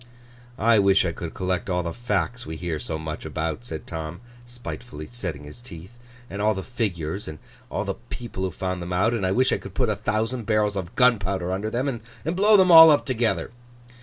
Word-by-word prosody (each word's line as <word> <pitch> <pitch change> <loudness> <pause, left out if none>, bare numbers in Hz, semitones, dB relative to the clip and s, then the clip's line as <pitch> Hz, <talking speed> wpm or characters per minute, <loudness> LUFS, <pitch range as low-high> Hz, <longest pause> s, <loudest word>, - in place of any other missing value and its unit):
'I 115 -1 +4
wish 100 -1 +4
I 85 - 0
could 85 0 -7
collect 90 0 -2
all 90 -1 0
the 85 0 -4
Facts 120 0 -2
we 80 - -6
hear 80 -1 -3
so 80 - -4
much 80 0 -6
about,' 80 +6 -3
said 80 -9 -6
Tom, 80 0 -6 0.3
spitefully 120 -8 -8
setting 85 -12 -5
his 75 +11 -10
teeth, 95 -1 -11 0.3
'and 100 -2 -5
all 105 0 +2
the 95 - -4
Figures, 100 -6 -3
and 80 - -7 0.3
all - - -2
the - - -1 0.2
people 120 -6 -6
who 95 - 0
found 90 +1 -4
them 85 +1 -4
out: 110 +6 +2
and 115 -4 -1
I - - 0
wish 130 +6 +3
I - - 0
could - - -10
put 125 -4 +1
a 105 - +1
thousand 110 +3 -2
barrels 105 -2 +2
of 95 -2 -5
gunpowder 100 -7 +2
under 100 +3 -2
them, 125 +5 -1
and 120 -5 -3 0.3
blow 210 +3 +6
them 185 -2 +5
all 165 -1 +11
up 150 - +4
together! 120 -4 0
100 Hz, 215 wpm, -24 LUFS, 85-120 Hz, 0.3 s, all